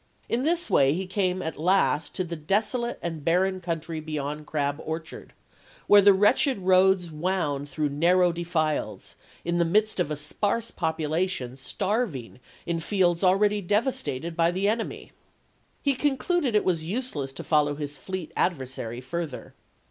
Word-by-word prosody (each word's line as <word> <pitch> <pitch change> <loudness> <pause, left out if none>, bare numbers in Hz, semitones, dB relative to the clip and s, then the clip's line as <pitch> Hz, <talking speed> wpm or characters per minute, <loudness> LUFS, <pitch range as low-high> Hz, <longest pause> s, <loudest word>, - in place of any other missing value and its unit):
In 235 - 0
this 335 +5 +2
^ - - -3
wsi?*' - - -8
way 135 0 +5
he 185 +4 -2
came 185 -1 -1
at 160 -2 -5
last 170 -2 +2
to 185 - 0
the 170 -1 -5
desolate 215 - 0
and 165 -3 -4
barren 185 +3 +1
country 165 -2 -3
beyond 150 -1 -4
Crab 145 0 -1
Orchard, 160 0 -6 0.5
where 205 0 +7
the 200 +1 +7
wretched 210 +7 +3
roads 185 -2 +3
wound 150 -4 -1
through 150 -1 -1
narrow 175 +5 +3
defiles, 165 -3 -2 0.3
in 170 0 0
the - - +4
midst 210 +5 +1
of 175 - +1
a 150 - -2
sparse 205 +10 -1
population 160 -4 -2
starving 140 - -3 0.3
in 170 -1 -1
fields 175 0 +1
already 205 +3 +3
devas 220 +8 0
tated 165 - -4
by 165 0 +3
the 190 +3 0
enemy. 225 +2 -2 0.7
He 280 - +3
concluded 280 0 0
it 210 - +3
was 170 -4 +1
useless 170 - -3
to - - -7
follow 150 -2 +2
his 145 -1 -5
fleet 185 +1 -6
adversary 130 -7 -2
further. 155 0 -5
175 Hz, 160 wpm, -26 LUFS, 155-200 Hz, 0.7 s, where